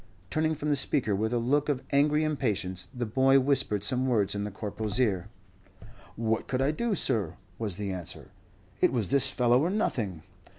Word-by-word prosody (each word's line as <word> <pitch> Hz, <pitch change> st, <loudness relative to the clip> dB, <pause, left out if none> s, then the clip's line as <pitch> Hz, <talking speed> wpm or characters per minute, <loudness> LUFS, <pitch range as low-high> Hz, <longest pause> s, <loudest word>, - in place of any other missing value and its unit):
Turning 155 Hz, 0 st, 0 dB
from 150 Hz, 0 st, -4 dB
the 145 Hz, -, +2 dB
speaker 135 Hz, -6 st, +2 dB
with 110 Hz, +3 st, -1 dB
a 120 Hz, -, 0 dB
look 145 Hz, +6 st, 0 dB
of 135 Hz, -2 st, -1 dB
angry 150 Hz, +2 st, +2 dB
impatience, 105 Hz, -, -2 dB
the 125 Hz, -2 st, -4 dB
boy 135 Hz, +4 st, +3 dB
whispered 130 Hz, -7 st, 0 dB
some 130 Hz, +4 st, +1 dB
words 110 Hz, -6 st, +1 dB
in 100 Hz, 0 st, -3 dB
the -, -, -4 dB
Corporal's 105 Hz, +2 st, -4 dB
ear. 100 Hz, -7 st, 0 dB, 0.9 s
"What 110 Hz, 0 st, -2 dB
could 130 Hz, -, -2 dB
I 135 Hz, +2 st, +1 dB
do, 220 Hz, +7 st, -2 dB
sir?" 105 Hz, -, -1 dB, 0.2 s
was 105 Hz, -5 st, -2 dB
the 100 Hz, 0 st, -4 dB
answer; 90 Hz, -4 st, -4 dB, 0.5 s
"it -, -, +3 dB
was 115 Hz, -7 st, -1 dB
this 135 Hz, -1 st, +8 dB
fellow 125 Hz, 0 st, +2 dB
or 165 Hz, -, 0 dB
nothing." 110 Hz, -, -2 dB
125 Hz, 185 wpm, -27 LUFS, 105-140 Hz, 0.9 s, this